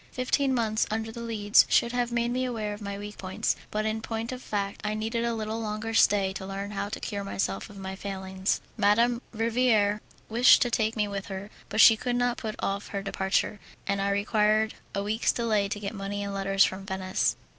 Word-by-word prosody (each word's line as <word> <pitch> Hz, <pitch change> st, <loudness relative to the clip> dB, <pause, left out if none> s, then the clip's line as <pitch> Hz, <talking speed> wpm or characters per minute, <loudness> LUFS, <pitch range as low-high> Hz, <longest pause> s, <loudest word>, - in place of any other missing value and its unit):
Fifteen 260 Hz, +1 st, +1 dB
months 220 Hz, -2 st, +1 dB
under 220 Hz, +1 st, -2 dB
the 235 Hz, -, -8 dB
Leads 215 Hz, -3 st, +4 dB
should 235 Hz, -, +3 dB
have 245 Hz, -1 st, -1 dB
made 235 Hz, 0 st, 0 dB
me 255 Hz, +1 st, 0 dB
aware 220 Hz, -4 st, -2 dB
of 205 Hz, -, -9 dB
my 200 Hz, -1 st, -4 dB
weak 205 Hz, +1 st, -8 dB
points, 190 Hz, 0 st, -1 dB
but 215 Hz, 0 st, -2 dB
in 220 Hz, 0 st, -1 dB
point 225 Hz, +1 st, -4 dB
of 255 Hz, 0 st, -6 dB
fact 200 Hz, -3 st, -3 dB
I 210 Hz, 0 st, -1 dB
needed 225 Hz, +2 st, -2 dB
a 235 Hz, -1 st, 0 dB
little 220 Hz, +1 st, -3 dB
longer 215 Hz, +1 st, -3 dB
stay 200 Hz, -3 st, +4 dB
to 190 Hz, -, -6 dB
learn 195 Hz, +1 st, -5 dB
how 205 Hz, 0 st, -3 dB
to 210 Hz, -, -5 dB
cure 200 Hz, -1 st, -4 dB
myself 195 Hz, +1 st, -2 dB
of 205 Hz, -, -12 dB
my 190 Hz, 0 st, -5 dB
failings. 190 Hz, -1 st, -2 dB, 0.2 s
Madame 230 Hz, +3 st, +3 dB
Riviere 220 Hz, -2 st, +2 dB, 0.3 s
wished 235 Hz, +3 st, +6 dB
to 245 Hz, -, -2 dB
take 220 Hz, -1 st, +1 dB
me 210 Hz, -2 st, +1 dB
with 200 Hz, -1 st, -5 dB
her, 195 Hz, +2 st, -6 dB, 0.2 s
but 215 Hz, -, +3 dB
she 225 Hz, -, +9 dB
could 245 Hz, +2 st, -2 dB
not 245 Hz, 0 st, +1 dB
put 215 Hz, -2 st, -4 dB
off 200 Hz, +1 st, -2 dB
her 200 Hz, -1 st, -4 dB
departure, 195 Hz, +1 st, 0 dB, 0.3 s
and 200 Hz, 0 st, 0 dB
I 200 Hz, -, +1 dB
required 215 Hz, +2 st, +2 dB, 0.2 s
a 200 Hz, -, -1 dB
week's 215 Hz, +3 st, +1 dB
delay 215 Hz, -4 st, +1 dB
to 205 Hz, 0 st, -3 dB
get 205 Hz, +1 st, -4 dB
money 205 Hz, 0 st, -4 dB
and 200 Hz, 0 st, -4 dB
letters 195 Hz, 0 st, +3 dB
from 190 Hz, +1 st, -1 dB
Venice. 190 Hz, -1 st, 0 dB
210 Hz, 215 wpm, -27 LUFS, 200-225 Hz, 0.3 s, she